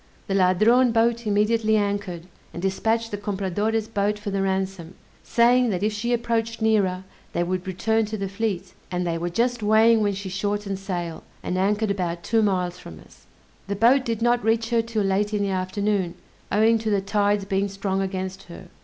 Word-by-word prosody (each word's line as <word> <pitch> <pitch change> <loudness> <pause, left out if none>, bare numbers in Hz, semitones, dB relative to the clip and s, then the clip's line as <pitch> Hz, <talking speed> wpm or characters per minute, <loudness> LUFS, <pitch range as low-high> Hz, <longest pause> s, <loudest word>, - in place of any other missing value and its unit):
The 195 - -3
Ladrone 215 +7 +4
boat 230 0 +1
immediately 215 +1 +2
anchored, 200 -4 -2 0.3
and - - -6
dispatched 225 +5 0
the 205 - -4
Compradore's 205 +2 -1
boat 210 -1 0
for 210 -1 -5
the 195 0 -1
ransom, 190 -2 -2 0.3
saying, 245 +1 +3
that 190 -2 -2
if 215 0 +1
she 230 +3 -2
approached 230 -1 -1
nearer, 200 -5 +1 0.3
they 175 - +1
would 185 +1 -3
return 220 +4 +1
to 215 +1 -4
the 195 -1 -3
fleet; 195 -2 -3 0.2
and 180 0 -2
they 165 -1 -1
were 175 +1 -2
just 240 +6 0
weighing 220 +2 +5
when 205 -1 +1
she 195 0 -6
shortened 200 +1 -2
sail, 175 -4 -4 0.2
and 180 - -2
anchored 205 +3 +1
about 175 -3 -3
two 225 -1 +2
miles 180 -3 0
from 80 -2 -11
us. - - -20 0.4
The 200 - -2
boat 240 +6 +4
did 230 -2 -2
not 240 0 +2
reach 225 +1 +1
her 230 -1 +3
'till 225 -2 -2
late 205 +2 0
in 205 - 0
the 200 - -1
afternoon, 190 0 -1 0.4
owing 220 +3 +4
to 220 0 -2
the 200 -2 +2
tide's 205 0 +1
being 195 0 0
strong 195 -1 -2
against 190 0 -4
her. 175 +1 -11
205 Hz, 190 wpm, -24 LUFS, 190-225 Hz, 0.4 s, weighing